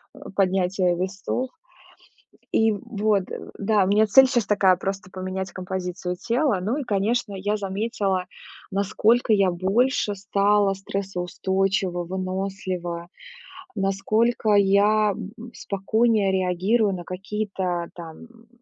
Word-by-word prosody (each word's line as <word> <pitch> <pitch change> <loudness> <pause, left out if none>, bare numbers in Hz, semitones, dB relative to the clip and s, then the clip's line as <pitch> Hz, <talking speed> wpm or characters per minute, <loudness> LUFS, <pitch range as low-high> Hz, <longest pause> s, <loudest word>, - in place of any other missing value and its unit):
э, - - -13 0.2
поднятие 185 -1 +2
весов. 195 +8 -3 1.0
И 225 0 +3
вот, 205 -1 0 0.3
да, 205 0 +2
у - - -1
меня 210 +2 +4
цель 265 +6 +7
щас 240 -5 +1
такая- 195 -3 +4
просто 195 0 -4
поменять 185 0 -4
композицию 180 -1 -4
тела. 240 +3 0
Ну, 220 +9 -1
и 295 - -2
конечно, 215 0 0
я 205 +3 -1
заметила, 195 -1 -1 0.5
насколько 215 +4 +2
я 195 -3 +3
больше 205 +5 +1
стала 200 0 +2
стрессоустойчива, 190 -1 -2
вынослива, 185 -1 -4 0.7
насколько 215 +3 +1
я, 205 +1 +4
б 190 - -7
м, 240 +1 -10
спокойнее 210 +1 +1
реагирую 190 +4 +1
на 180 -2 -5
какие-то 185 -2 -3
там, 165 -2 -9
м, 230 -1 -21
195 Hz, 115 wpm, -24 LUFS, 185-215 Hz, 1.0 s, цель